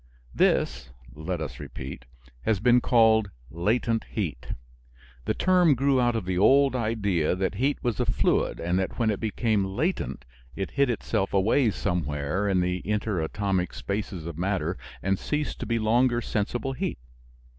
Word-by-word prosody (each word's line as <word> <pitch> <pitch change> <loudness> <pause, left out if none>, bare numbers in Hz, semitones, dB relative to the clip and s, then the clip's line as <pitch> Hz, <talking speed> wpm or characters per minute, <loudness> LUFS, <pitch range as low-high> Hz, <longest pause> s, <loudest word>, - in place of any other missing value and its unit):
This - - +1 0.2
(let 80 +5 -4
us 80 - -6
repeat) 65 -1 -8 0.4
has 105 - +1
been 125 +3 +4
called 110 -4 +4 0.2
latent 110 +7 0
heat. 75 - -4 0.8
The - - 0
term 180 -5 +4
grew 135 0 +2
out 120 -1 +2
of 110 -5 -2
the 90 -1 -1
old 135 +6 +5
idea 100 -9 0
that 95 +1 -1
heat 140 +2 +2
was 120 -4 -1
a - - +2
fluid - - +1
and 85 +2 0
that 95 - -3
when 115 -2 +2
it 100 - -3
became 110 -1 0
latent 125 - -2 0.3
it 95 - -4
hid 140 -2 +2
itself 110 -4 -1
away 110 +6 +3
somewhere 90 -1 -1
in 95 -2 +2
the 90 0 -1
interatomic 100 -2 -1
spaces 100 -4 -4
of 85 -1 -6
matter 95 +1 -1 0.3
and 95 0 +1
ceased 150 0 -2
to - - -5
be 115 - +1
longer 120 +2 +2
sensible 120 +4 -2
heat. - - -3
105 Hz, 155 wpm, -26 LUFS, 90-120 Hz, 0.8 s, old